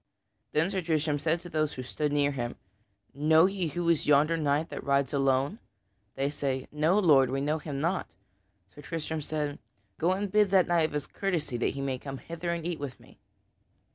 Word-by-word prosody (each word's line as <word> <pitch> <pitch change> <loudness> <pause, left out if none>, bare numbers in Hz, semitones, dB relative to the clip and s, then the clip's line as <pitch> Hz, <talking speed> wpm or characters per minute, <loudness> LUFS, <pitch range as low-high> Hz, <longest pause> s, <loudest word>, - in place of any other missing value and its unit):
Then 160 +5 +2
Sir 190 -2 -1
Tristram 155 -3 0
said 165 +3 0
to 175 - -9
those 155 -2 0
who 130 - -6
stood 150 +3 -2
near 145 0 +2
him, 120 -3 -4 0.6
"Know 155 +4 +5
ye 190 -2 -1
who 170 +3 -3
is 170 -3 +2
yonder 150 +3 +4
knight 150 0 0
who - - -4
rides 140 -1 +1
alone?" 135 - +1 0.6
They 135 +1 0
say, 135 -3 -2
"No, 155 +6 +2
Lord, 145 -10 +5
we 135 +1 -1
know 150 +3 0
him 145 -3 -5
not." 170 +5 0 0.7
Sir 145 - -12
Tristram 160 0 -4
said, 150 -1 -3 0.4
"Go 175 +3 +3
and 200 0 -3
bid 210 -1 +4
that 190 -2 +5
knight 170 -2 +3
of - - -12
his 150 -1 -2
courtesy 170 -9 -2
that 120 - -1
he 135 -2 -2
come 135 0 -6
hither 170 +4 -6
and 170 -1 -2
eat 175 -2 -2
with 140 -3 -6
me." - - -19
155 Hz, 200 wpm, -29 LUFS, 140-170 Hz, 0.7 s, Know